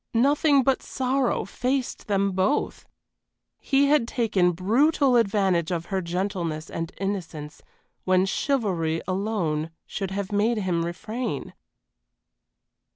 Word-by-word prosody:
Nothing 280 +3 +4
but 265 +1 +2
sorrow 260 -3 0
faced 255 +6 -2
them 200 -1 +1
both. 190 +9 0 0.7
He 275 0 +2
had 290 -6 +3
taken 210 -8 +2
brutal 250 - +3
advantage 195 -7 +2
of 170 -2 -2
her 190 - +1
gentleness 170 -3 -3
and 165 +1 -4
innocence 165 -6 -4 0.4
when 185 0 +3
chivalry 190 - 0
alone 185 -6 -1 0.2
should 195 -2 -4
have 195 0 -4
made 215 +3 +2
him 180 -5 0
refrain. 215 - -4
195 Hz, 110 wpm, -25 LUFS, 175-245 Hz, 0.7 s, Nothing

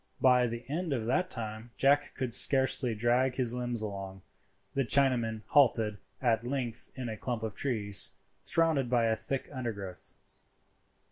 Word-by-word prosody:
By 125 -1 +4
the 120 +1 -7
end 160 +2 -2
of 115 -4 -2
that 180 +10 0
time 110 -4 -5
Jack 145 +1 +2
could 130 -3 -3
scarcely 130 -3 +3
drag 120 +4 +1
his 125 -3 +2
limbs 120 -2 -3
along. 95 -2 -7 0.5
The 135 - 0
Chinaman 120 -5 +2
halted 115 -7 +3 0.2
at 115 -3 +1
length 125 -2 -3
in 130 -2 -5
a 110 - -4
clump 120 0 -4
of 110 -2 -4
trees, 105 -7 +3 0.3
surrounded 160 -6 +1
by 120 -2 +2
a 110 -1 +1
thick 135 +4 -4
undergrowth. 100 -8 -6
120 Hz, 150 wpm, -30 LUFS, 110-135 Hz, 0.5 s, By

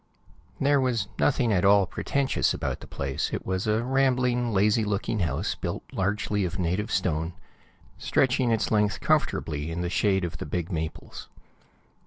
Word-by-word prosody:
There 140 0 +3
was 120 -6 0
nothing 125 -5 +2
at 90 - +2
all 100 0 +6
pretentious 135 +8 0
about - - -3
the - - -11
place; 70 -1 -3
it - - -4
was 95 +2 -2
a 110 +2 +1
rambling, 125 -2 +1
lazy 105 +2 +3
looking 105 +1 -1
house 85 -4 -1
built - - -4
largely 105 +1 0
of 90 -1 -3
native 90 +4 -1
stone, 85 -2 0 0.7
stretching 130 -1 +2
its 115 -2 0
length 105 -2 +2
comfortably 75 0 0
in 85 +1 -3
the 90 - -2
shade 95 -2 +2
of 85 -2 -6
the - - -5
big 85 +4 -3
maples. 80 -2 -5
100 Hz, 160 wpm, -26 LUFS, 90-120 Hz, 0.7 s, all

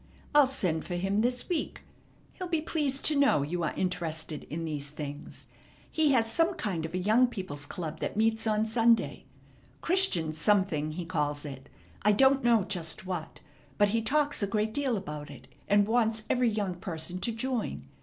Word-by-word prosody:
I'll 295 -2 +7
send 180 -12 -1
for 175 - -4
him 195 +4 0
this 245 +1 -1
week. 350 -4 -3 0.5
He'll 365 - -6
be 335 -2 0
pleased 295 -4 -2
to 310 - +5
know 275 - +4
you 175 +5 -3
are - - -1
interested 160 -4 -3
in 165 +2 -5
these 145 -3 -3
things. 145 -1 -7 0.5
He 310 -2 +3
has 230 -3 +4
some 335 +7 +2
kind 175 - -2
of 165 - -8
a - - +1
young 215 +7 +4
people's 185 -11 -6
club 165 -5 -5
that - - -3
meets 225 0 +2
on 215 0 +2
Sunday. 230 +1 +2 0.6
'Christian 330 - +1
Something' 160 -3 +1
he 175 +1 -5
calls 150 -2 -1
it; 135 -2 -9 0.3
I 210 +1 +4
don't 265 +4 +4
know 235 -4 +4
just 180 -3 -2
what, 175 -4 -5 0.4
but 205 -1 +4
he 225 +2 +1
talks 290 +4 +1
a 200 - +1
great 215 +2 -1
deal 265 -4 0
about 150 -6 -6
it, - - -12 0.2
and 205 0 +4
wants 225 -1 +2
every 250 -1 +3
young 205 -4 -1
person 175 0 -2
to 230 - 0
join. 240 +1 -3
205 Hz, 185 wpm, -29 LUFS, 165-245 Hz, 0.6 s, I'll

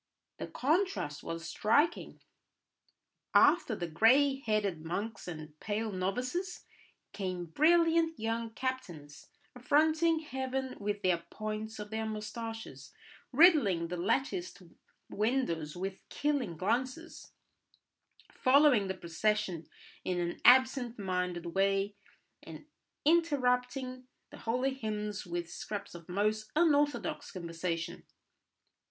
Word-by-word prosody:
The - - -4
contrast 295 - 0
was 165 0 -5
striking: 290 - +1 1.1
after 295 -7 +5
the 175 - -3
grey 260 - +4
headed 205 -9 -1
monks 200 +6 -4
and 155 -3 -8
pale 215 +1 -2
novices 250 - -3 0.5
came 185 -3 -3
brilliant 325 - +3
young 225 +1 -2
captains, 190 - -5 0.3
affronting 315 +5 +3
heaven 265 -2 -3
with 205 0 -3
the 180 -2 +2
points 215 0 -5
of 210 0 -7
their 220 0 -2
moustaches, 225 +1 -6 0.4
riddling 245 - +5
the 180 - -3
latticed 270 - -1 0.4
windows 200 - -1
with 190 +1 -4
killing 275 - -1
glances, 255 - -3 1.0
following 260 -6 +4
the 190 - -3
procession 185 0 -1 0.4
in 180 -1 -1
an 175 0 -3
absent 255 -1 +5
minded 180 -3 -2
way, 195 +1 +1 0.5
and - - -11 0.4
interrupting 255 -5 +1 0.2
the - - -10
holy 250 +4 0
hymns 210 -5 -4
with 175 0 -3
scraps 205 +4 -6
of 170 -1 -11
most 215 +3 0
unorthodox 295 -3 +1
conversation. 170 -1 -4
220 Hz, 105 wpm, -32 LUFS, 185-265 Hz, 1.1 s, after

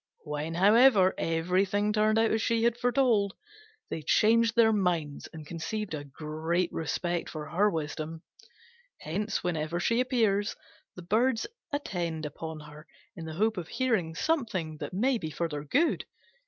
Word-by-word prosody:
When, 150 +2 -4
however, 205 +1 +6
everything 185 +5 +1
turned 215 +1 +3
out 225 0 +3
as 220 - +1
she 230 0 +1
had 235 0 +3
foretold, 240 -5 +2 0.6
they 160 - -3
changed 230 +6 +3
their 225 -1 +5
minds 175 -8 -1
and 155 -2 -9
conceived 185 +6 -4
a 145 -2 -4
great 155 +5 -2
respect 170 +2 -2
for 155 -2 -6
her 200 +6 +3
wisdom. 160 -1 -4 0.8
Hence, 205 +7 -2
whenever 165 -1 -1
she 230 +6 +1
appears, 220 -5 +1 0.4
the 180 - -9
Birds 225 +6 +1 0.3
attend 170 - -3
upon 160 +1 -6
her 150 +1 -13 0.3
in 165 - -7
the 160 - -6
hope 220 +3 +1
of 170 -3 -4
hearing 215 -12 0
something 195 - -1
that - - -6
may 240 +6 +1
be 160 - -4
for 155 +3 -2
their 150 -2 -5
good. 305 - +1
185 Hz, 155 wpm, -29 LUFS, 160-220 Hz, 0.8 s, however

